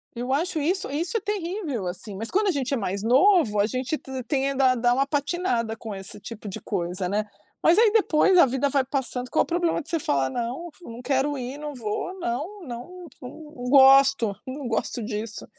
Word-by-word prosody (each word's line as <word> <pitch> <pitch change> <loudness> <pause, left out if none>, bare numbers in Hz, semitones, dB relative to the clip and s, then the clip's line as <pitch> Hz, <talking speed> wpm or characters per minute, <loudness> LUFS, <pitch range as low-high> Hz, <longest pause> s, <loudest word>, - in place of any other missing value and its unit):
Eu 245 +2 -2
acho 325 +3 0
isso 355 +4 -1
isso 335 - -1
terrível, 355 - -3
assim. 190 +3 -5
Mas, 225 +4 -5
quando 415 +2 +2
a - - +4
gente 280 -3 -2
é - - +1
mais 200 -2 -3
novo, 255 - +4
a 200 - +4
gente 255 +6 -2
t 265 -3 -7
tenda 270 +1 +2
a - - +1
dar 240 0 +2
uma 270 +2 +2
patinada 280 -6 -1
com 220 -1 -7
esse 195 +1 -7
tipo 215 +1 -9
de 190 - -6
coisa, 180 +2 -2
né. 210 +3 -1 0.4
Mas 335 +3 +5
aí, 445 -1 +5
depois, 385 -4 +4
a 345 - +8
vida 265 +2 0
vai 275 -1 +1
passando. 255 -2 -2
Qual 315 - +3
o - - -8
problema 340 -1 0
de - - -10
você 330 - 0
falar: 135 - 0
“Não 245 - -4
f 355 - -21
não 230 +1 -8
quero 270 +3 0
ir. 255 +2 -5
Não 295 0 -6
vou. 245 - -4
Não, 335 - -4
não, 310 +10 -8 0.2
não 250 - -7 0.4
gosto. 270 -4 +6
Não 270 +2 -6
gosto 230 +1 -2
disso. 215 0 -5
265 Hz, 210 wpm, -25 LUFS, 230-320 Hz, 0.4 s, a